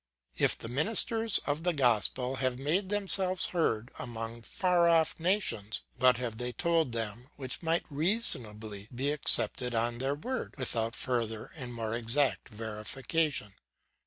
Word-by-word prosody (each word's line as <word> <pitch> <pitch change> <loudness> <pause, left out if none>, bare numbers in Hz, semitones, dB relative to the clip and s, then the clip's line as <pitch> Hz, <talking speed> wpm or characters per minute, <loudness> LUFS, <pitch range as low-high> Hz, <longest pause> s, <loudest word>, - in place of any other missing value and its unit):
"If - - +3
the - - -7
ministers 220 - +3
of 145 +2 -1
the 175 +1 0
gospel 125 0 +2
have 130 -1 -1
made 165 +9 -1
themselves 190 -3 +4
heard 120 -10 -1
among 115 -1 -6
far 175 - +2
off 165 -1 +2
nations, 160 - 0
what 125 -1 +4
have 120 -2 -5
they 125 0 -2
told 165 -4 +1
them 115 +1 -4
which 130 -3 -4
might 165 0 0
reasonably 115 - -2
be 135 +4 0
accepted 125 -4 +2
on 120 +1 -1
their 135 +2 0
word, 255 - -5
without 115 -3 0
further 115 -4 -2
and 130 -5 -6
more 115 -2 -4
exact 120 +4 +1
verification? 110 +4 -2
130 Hz, 140 wpm, -30 LUFS, 115-165 Hz, -, themselves